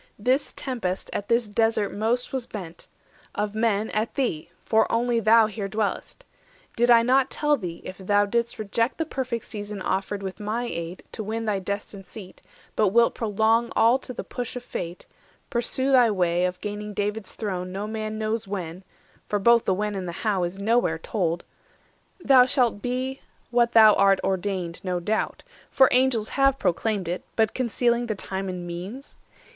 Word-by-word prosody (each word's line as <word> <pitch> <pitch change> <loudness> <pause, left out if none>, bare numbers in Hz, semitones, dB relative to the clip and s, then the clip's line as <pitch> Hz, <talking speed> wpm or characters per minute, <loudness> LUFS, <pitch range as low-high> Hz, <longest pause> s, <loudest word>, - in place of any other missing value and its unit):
This 260 +3 +1
tempest 220 -9 -3
at 205 - -3
this 235 -1 +2
desert 220 0 +1
most 230 +5 -1
was 260 -3 -2
bent; 175 -5 -8 0.5
Of 210 0 -1
men 220 -1 0
at 215 +2 -2
thee, 170 - -1 0.2
for 220 0 +3
only 235 0 +1
thou 225 +1 +6
here 210 -1 -4
dwell'st. 215 - -3 0.5
Did 240 +1 +2
I 230 -1 +7
not 260 +2 +3
tell 295 -1 +2
thee, 175 -9 -7
if 185 - -8
thou 205 +2 +2
didst 235 +3 -1
reject 230 +4 -1
The 325 - -1
perfect 255 -5 -3
season 205 -1 -6
offered 195 +2 -2
with 190 +1 -6
my 215 +3 -2
aid 170 -6 -5
To 220 - -5
win 225 +2 -3
thy 205 -3 0
destined 200 0 -5
seat, 195 -4 -11 0.3
but 215 - +3
wilt 235 +4 +4
prolong 225 +2 +1
All 235 +4 +5
to 255 - -8
the 250 - -5
push 245 -1 -5
of 250 - -5
fate, 175 -6 -6 0.5
pursue 260 +2 0
thy 250 -3 +6
way 180 -4 +1
470 180 - +3
Of 180 0 -6
gaining 210 0 -5
David's 205 0 -3
throne 185 -4 -3
no 195 +2 -4
man 215 0 -4
knows 220 0 -2
when 185 -2 -5 0.4
(For 205 - -1
both 235 +3 +4
the 190 - +2
when 210 +2 -2
and 185 -3 -4
how 195 +2 -1
is 175 +2 -2
nowhere 205 -5 +1
told), 175 -1 -2 0.8
Thou 265 -6 +6
shalt 245 -6 +2
be 255 +3 -3 0.3
what 240 0 +3
thou 220 -2 +8
art 195 -1 +4
ordained, 190 -2 -2
no 180 -2 -1
doubt; 210 +5 -2 0.3
For 265 - +5
Angels 250 -4 +2
have 275 0 +3
proclaimed 195 -1 0
it, 175 +2 -3
but 220 -1 +2
concealing 240 -1 +1
The 215 - -2
time 190 0 -4
and 180 -1 -5
means? 185 +10 -7
215 Hz, 180 wpm, -25 LUFS, 195-235 Hz, 0.8 s, thou